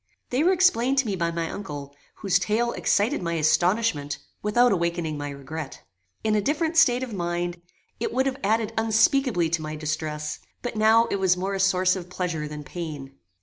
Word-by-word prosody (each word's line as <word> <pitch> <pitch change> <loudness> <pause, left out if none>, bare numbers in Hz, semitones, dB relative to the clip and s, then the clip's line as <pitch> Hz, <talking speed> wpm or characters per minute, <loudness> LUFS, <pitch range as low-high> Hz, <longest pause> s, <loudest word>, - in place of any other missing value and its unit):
They 255 +4 +2
were 360 - +4
explained 275 -9 +3
to 275 - +3
me 205 -3 -1
by 170 -2 0
my 165 0 -2
uncle, 145 -7 -7 0.2
whose 195 -3 +1
tale 235 +3 0
excited 205 -1 +1
my 170 -1 -2
astonishment 165 -1 +1 0.2
without 240 +4 +3
awakening 170 -3 -1
my 145 0 -4
regret. 140 +2 -7 0.4
In 215 -1 +1
a 210 - +2
different 315 - 0
state 250 -5 +5
of 245 -4 -6
mind, 175 -1 -3 0.4
it 450 - -2
would 265 - +1
have 270 0 -2
added 220 +1 +1
unspeakably 225 - +3
to 170 -1 0
my 155 0 -5
distress, 150 0 -3 0.2
but 245 - -4
now 220 +2 +5
it - - +1
was 185 -2 +2
more 190 +2 -2
a 195 - -2
source 185 -1 +3
of 180 -2 -7
pleasure 175 -5 -3
than 150 0 -7
pain. 150 -4 -7
185 Hz, 190 wpm, -25 LUFS, 160-230 Hz, 0.4 s, state